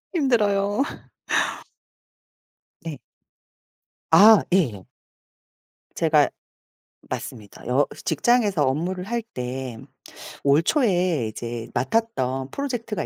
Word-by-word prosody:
힘들어요. 210 - +2 2.0
네. 160 -4 -6 1.1
아 210 +6 +8
예. 130 - +1 1.1
제가 155 -3 +3 0.8
맞습니다. 105 -5 -7
여 130 +4 +3 0.2
직장에서 210 -10 +2
업무를 175 +7 -1
할 235 +3 -2
때 130 - -6 0.7
올 140 +2 +4
초에 180 - +1
이제 115 +1 -6
맡았던 130 - -1
프로젝트가 245 -6 -3
170 Hz, 165 characters per minute, -23 LUFS, -, 2.0 s, 아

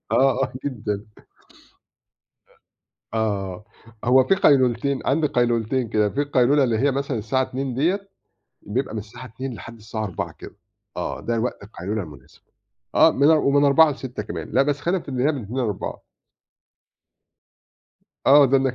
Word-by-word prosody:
آه، 135 0 +3
آه، - - -7
جدًا. 105 -6 -4 2.1
آه، 100 -3 -2 0.4
هو 130 +2 +5
فيه 195 +9 +2
قيلولتين 135 -4 +3
عندي 150 +2 +2
قيلولتين 120 0 0
كده؛ 105 -2 +2
في 145 - 0
القيلولة 140 0 +3
اللي 115 -4 +1
هي 140 +2 +2
مثلًا 140 -2 -2
الساعة 115 +5 0
14:00 130 0 -3
ديّة، 185 +10 0 0.5
بيبقى 120 +3 -3
من 110 - -2
الساعة 120 +4 -11
14:00 125 +3 -6
لحد 115 +1 -10
الساعة 110 0 -5
16:00 95 -5 -4
كده، - - -11 0.4
آه - - -4
ده 115 -1 -1
وقت 125 -2 -3
القيلولة 100 +1 -4
المناسب، 75 -3 -14 0.5
آه - - +6
من 140 +3 +3
ومن 145 -2 +4
16:00 150 +3 +6
ل18:00 125 -5 -6
كمان، 85 -6 -6
لأ 130 - +4
بس 145 +1 -1
خلينا 175 +3 -1
في - - -20
اللي 130 -1 -1
هي 155 - +3
من 135 -5 -5
14:00 115 +6 -6
ل16:00. 105 -5 -3 2.2
آه 140 +1 +8
ده 135 +1 +4
أنا 135 0 +2
ك - - -12
125 Hz, 160 wpm, -23 LUFS, 110-140 Hz, 2.2 s, آه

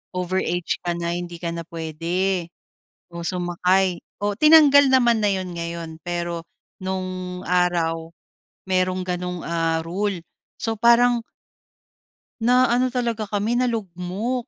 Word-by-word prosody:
over 180 +1 -1
age 175 0 -1
ka 175 - 0
na, 170 0 -2
hindi 175 -1 -6
ka 170 - -2
na 170 - -5
pwede 170 +3 -1 0.6
o 170 0 -6
sumakay 180 +1 +1 0.2
o 205 0 0
tinanggal 290 -2 +7
naman 240 -3 +4
na 205 - +4
yon 185 -2 -4
ngayon 170 -1 -5
pero 175 -1 -3 0.4
noong 185 -1 -4
araw, 165 -2 +1 0.6
merong 185 0 +1
ganong 180 -1 -3
ah, 165 -1 0
rule 195 +2 -2 0.4
so 225 - -1
parang 235 +2 +4 1.2
na 250 +2 +4
ano 250 +2 +3
talaga 235 -4 -2
kami, 210 +4 0
nalugmok 225 +1 -2
185 Hz, 125 wpm, -23 LUFS, 170-225 Hz, 1.2 s, tinanggal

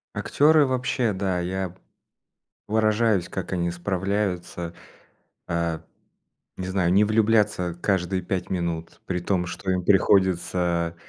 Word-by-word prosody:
Актеры 150 +1 +4
вообще, 125 -3 0
да. 95 -1 -1
Я 90 0 -3 0.9
поражаюсь, 110 -3 +2
как 95 -1 -5
они 85 -1 0
справляются, 90 -1 -2 0.7
а, 85 -1 -1 0.8
не 95 - -4
знаю, 95 -2 +1
не 100 +2 +5
влюбляться 105 -5 +2
каждые 95 -1 0
5 90 +1 -3
минут, 85 -2 -3
при 90 -1 -2
том 90 0 0
что 90 +2 -3
им 90 -1 0
приходится, 90 -3 +2
95 Hz, 115 wpm, -24 LUFS, 85-105 Hz, 0.9 s, не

